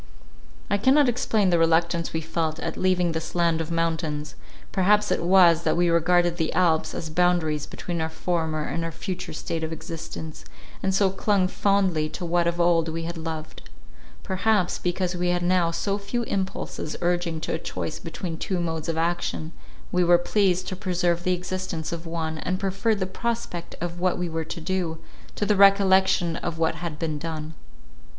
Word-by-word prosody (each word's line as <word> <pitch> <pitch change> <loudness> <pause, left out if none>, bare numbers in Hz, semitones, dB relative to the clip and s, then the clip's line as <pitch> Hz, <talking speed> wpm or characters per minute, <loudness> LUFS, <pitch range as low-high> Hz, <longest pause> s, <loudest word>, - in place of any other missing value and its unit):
I 205 - +1
cannot 270 +5 +5
explain 225 -5 +1
the 170 - +3
reluctance 165 +1 +2
we 160 - -2
felt 160 0 -2
at - - -3
leaving 180 -2 +2
this 160 +1 -5
land 170 -2 +2
of 160 - -5
mountains; 160 -3 -1 0.4
perhaps 205 +2 +3
it - - +1
was, 175 -2 +6
that - - +1
we 175 0 +3
regarded 175 +1 +3
the 160 -2 0
Alps 165 -3 +2
as 160 - -5
boundaries 160 -3 +1
between 170 -2 -4
our 160 - -1
former 160 -2 -1
and 165 +2 -3
our 165 - -3
future 185 +2 -5
state 160 +1 -4
of 160 - -3
existence, 160 -1 -7 0.4
and 190 0 +1
so 195 -1 +3
clung 195 -1 +2
fondly 185 -6 +1
to 180 - -5
what 170 0 +2
of 170 0 -1
old 170 -1 +3
we 165 +1 -4
had 170 +1 -4
loved. 160 -1 -6 0.5
Perhaps, 195 -1 +1
because 180 0 -1
we 180 0 -1
had 175 0 +1
now 175 -1 +3
so 200 +4 -1
few 220 +4 -2
impulses 190 -6 -3
urging 175 -2 0
to - - -2
a 160 - -1
choice 160 -1 -4
between 165 0 -5
two 185 -2 -1
modes 165 -1 -2
of 165 - -1
action, 165 -1 -1 0.4
we 180 0 +3
were 175 0 +6
pleased 185 0 +1
to 185 - -4
preserve 175 -2 0
the 185 - +2
existence 180 -2 -4
of 170 0 -5
one, 160 -1 -3
and 185 +3 -2
preferred 195 +3 0
the 185 - 0
prospect 190 -4 -4
of 175 0 -4
what 185 0 +1
we 180 - -2
were 160 -1 -3
to 170 - -6
do, 170 -1 -2 0.4
to 205 - -1
the 210 0 +3
recollection 190 -3 +5
of 170 -1 -4
what 160 0 +1
had 165 -1 -5
been 155 -2 -2
done. 160 0 -5
175 Hz, 185 wpm, -25 LUFS, 165-185 Hz, 0.5 s, was